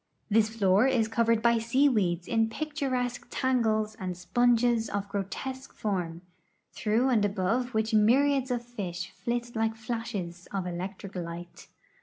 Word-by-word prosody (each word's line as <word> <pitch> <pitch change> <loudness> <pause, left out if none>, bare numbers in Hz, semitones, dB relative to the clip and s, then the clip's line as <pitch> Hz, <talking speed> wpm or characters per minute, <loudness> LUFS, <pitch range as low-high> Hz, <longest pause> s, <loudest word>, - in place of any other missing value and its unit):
This 220 0 +4
floor 210 +1 +3
is 240 -5 +2
covered 230 0 +2
by 235 -1 +4
sea 255 +5 +3
weeds 180 -9 +1
in 225 -1 +2
picturesque 265 -3 -2
tangles 220 -4 +1
and 185 -3 -4
sponges 240 +3 +2
of 200 0 -2
grotesque 205 +7 -5
form, 175 -5 -3 0.5
through 230 +4 +1
and 225 -5 +3
above 210 +5 0
which 220 +1 0
myriads 265 +5 +4
of 240 -1 -2
fish 185 -6 -5
flit 240 0 -3
like 225 0 0
flashes 220 -7 -5
of 195 -2 -2
electric 185 +2 -5
light. 175 -1 -7
225 Hz, 140 wpm, -28 LUFS, 195-245 Hz, 0.5 s, This